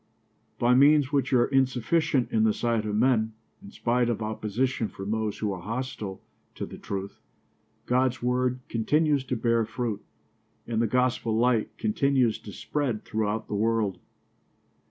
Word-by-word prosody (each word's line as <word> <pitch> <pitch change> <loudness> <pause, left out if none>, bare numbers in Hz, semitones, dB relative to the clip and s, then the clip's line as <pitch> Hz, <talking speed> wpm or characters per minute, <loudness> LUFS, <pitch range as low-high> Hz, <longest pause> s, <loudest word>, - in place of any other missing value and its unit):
By 120 0 +3
means 145 +1 +5
which 140 -2 +1
are 120 -2 +4
insufficient 135 +2 +1
in 110 - +2
the 110 -1 +3
sight 115 -2 0
of 105 - -2
men, 110 -1 +2 0.3
in 200 - -11
spite 120 - 0
of 115 - -1
opposition 110 +3 -1
from 95 +1 -6
those 110 -1 -1
who 105 -2 -1
are 90 - -7
hostile 110 -2 -5 0.3
to - - -4
the - - -10
truth, 100 0 -5 0.7
God's 130 +1 +1
word 125 +1 0
continues 145 +5 +1
to 125 - -2
bear 115 0 +2
fruit 115 -2 -3 0.6
and 115 -1 -1
the 115 - +2
gospel 125 -2 +1
light 120 -2 +1
continues 125 +1 +1
to 105 - -10
spread 125 +3 -3
throughout 110 0 -2
the - - -6
world. 105 -3 0
115 Hz, 155 wpm, -27 LUFS, 110-130 Hz, 0.7 s, means